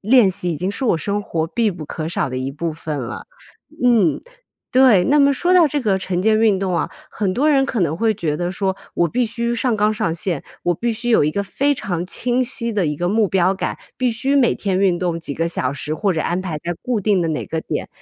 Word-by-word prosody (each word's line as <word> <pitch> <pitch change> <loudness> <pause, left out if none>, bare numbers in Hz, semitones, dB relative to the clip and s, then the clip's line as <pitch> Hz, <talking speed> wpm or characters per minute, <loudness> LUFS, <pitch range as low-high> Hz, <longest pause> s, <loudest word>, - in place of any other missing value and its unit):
练 220 -2 +5
习， 180 -1 -2
已 165 - -2
经 180 +6 -2
是 255 +6 -3
我 175 - +3
生 205 +4 -1
活 160 -4 -2
必 230 +1 +1
不 170 -4 -7
可 155 +2 -5
少 140 -5 -1
的 130 - -3
一 130 +1 -3
部 160 +3 -3
分 155 -2 -5
了。 120 -2 -6 0.6
嗯， 225 -9 +3 0.5
对， 250 -8 +6
那 295 +1 +4
么 280 0 +5
说 350 +7 +1
到 345 -3 +7
这 290 +1 -1
个 205 -5 +1
晨 185 -2 -2
间 215 0 +3
运 210 -4 +3
动 185 -3 -1
啊， - - -1 0.2
很 200 -3 -1
多 285 +6 +2
人 275 -2 +4
可 250 - -2
能 165 -2 +1
会 225 +4 +2
觉 155 -6 -2
得 175 +1 -2
说， 190 0 -1 0.2
我 170 - +2
必 245 +6 0
须 235 +1 -2
上 235 -1 0
纲 210 +1 +2
上 210 -7 -1
线， 170 -2 -2 0.2
我 175 - +2
必 235 +7 -1
须 230 +2 -4
有 225 - +5
一 150 - +1
个 200 +6 -1
非 280 +8 +1
常 180 -9 -3
清 245 +6 0
晰 235 -2 -2
的 200 -3 +1
一 150 - -2
个 175 +3 -1
目 215 0 +2
标 190 0 +2
感， - - -3 0.2
必 255 -1 +1
须 250 +5 -1
每 250 -4 +4
天 195 -3 -1
运 185 -3 +2
动 170 -2 -2
几 155 - -3
个 165 +3 -1
小 135 -5 -1
时， 150 +2 -4
或 200 +3 0
者 160 - -1
安 175 +2 -1
排 180 -5 -4
在 175 +1 -2
固 245 -4 -1
定 200 -3 +2
的 165 - -1
哪 155 - -3
个 160 - -3
点。 - - -4
195 Hz, 275 characters per minute, -20 LUFS, 170-235 Hz, 0.6 s, 到